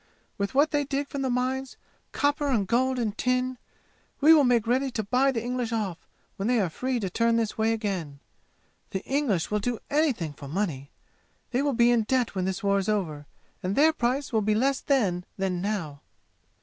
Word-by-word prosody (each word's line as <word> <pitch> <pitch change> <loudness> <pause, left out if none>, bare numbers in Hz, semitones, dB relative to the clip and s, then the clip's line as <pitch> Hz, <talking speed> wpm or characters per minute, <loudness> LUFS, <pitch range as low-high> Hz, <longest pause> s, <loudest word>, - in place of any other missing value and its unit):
With 200 +6 -3
what 290 +3 +4
they 290 -1 +1
dig 280 0 -3
from 280 - -4
the 265 - 0
mines, 255 +1 -2 0.3
copper 290 0 +1
and 230 -8 +1
gold 255 +5 +1
and 220 -4 -1
tin, 255 +1 0 0.6
we 310 +3 +7
will 305 -3 +6
make 240 -3 +3
ready 260 +4 +1
to 225 -3 -3
buy 255 +6 +2
the 230 -4 -3
English 245 -1 -2
off 205 -7 -3 0.3
when 195 - -2
they 245 -1 +3
are 185 -5 0
free 255 +6 -2
to 195 - -1
turn 230 +5 +1
this 225 -2 0
way 220 +1 +1
again. 190 -10 -3 0.7
The 190 - -4
English 265 - 0
will 210 - +1
do 240 +3 -2
anything 270 - +1
for 140 -1 -10
money! 145 -5 -3 0.6
They 255 +1 +1
will 285 -1 +1
be 235 0 +4
in 240 -2 +3
debt 255 0 +1
when 185 -2 -1
this 190 0 -3
war 200 0 +3
is 195 - -2
over, 155 -9 -2 0.3
and 185 +2 -2
their 315 +3 +5
price 260 0 -1
will 220 - +3
be 210 +1 +1
less 265 +4 +2
then 200 -11 +1
than 190 -2 -1
now!" 175 -9 -3
230 Hz, 200 wpm, -27 LUFS, 195-260 Hz, 0.7 s, we